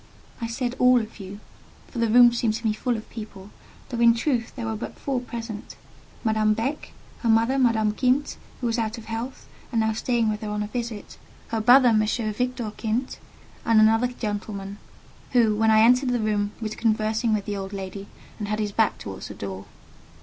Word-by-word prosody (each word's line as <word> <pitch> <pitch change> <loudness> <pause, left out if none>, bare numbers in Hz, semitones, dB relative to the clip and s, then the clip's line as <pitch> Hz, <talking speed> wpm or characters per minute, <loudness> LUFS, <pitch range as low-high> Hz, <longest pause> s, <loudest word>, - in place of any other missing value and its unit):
I 230 - -1
said, 245 +2 -3
"All 250 0 +6
of 220 -1 -7
you;" 195 +1 -8 0.5
for 240 - -7
the 230 -1 +2
room 240 +1 +7
seemed 230 -2 0
to 230 - -6
me 215 - +2
full 235 +2 -1
of 220 - -9
people, 210 -3 -9 0.4
though 240 - -4
in 235 -1 +6
truth 235 -2 -1
there 240 -3 -4
were 220 0 -2
but 215 - -7
four 270 -3 -2
present: 230 -3 -7 0.5
Madame 215 -2 +2
Beck; 265 +7 -3 0.3
her 235 - -1
mother, 230 +4 +3
Madame 225 -4 +3
Kint, 255 +6 0 0.2
who - - -2
was 235 0 0
out 225 +1 -2
of 225 - -10
health, 230 +4 -6 0.2
and 230 -3 +1
now 220 0 +1
staying 235 0 0
with 210 +1 -4
her 215 - -4
on 210 0 -2
a - - -4
visit; 230 -2 -6 0.3
her 225 -1 -1
brother, 250 +3 +7
M. 220 -2 +4
Victor 225 +1 -2
Kint, 230 +4 -2 0.4
and 225 -1 +4
another 225 +3 +5
gentleman, 205 -4 -5 0.5
who, 225 -4 +4
when 220 +1 +2
I 220 0 +6
entered 250 +3 +5
the 245 -1 +1
room, 210 -1 0
was 215 -1 -4
conversing 220 +1 0
with 205 - -3
the 205 - -3
old 195 -1 -5
lady, 195 0 -6 0.3
and 210 - -3
had 210 +1 -1
his 210 -1 -2
back 220 +1 +1
towards 95 -2 -7
the - - -9
door. 95 -1 -6
225 Hz, 200 wpm, -25 LUFS, 215-240 Hz, 0.5 s, room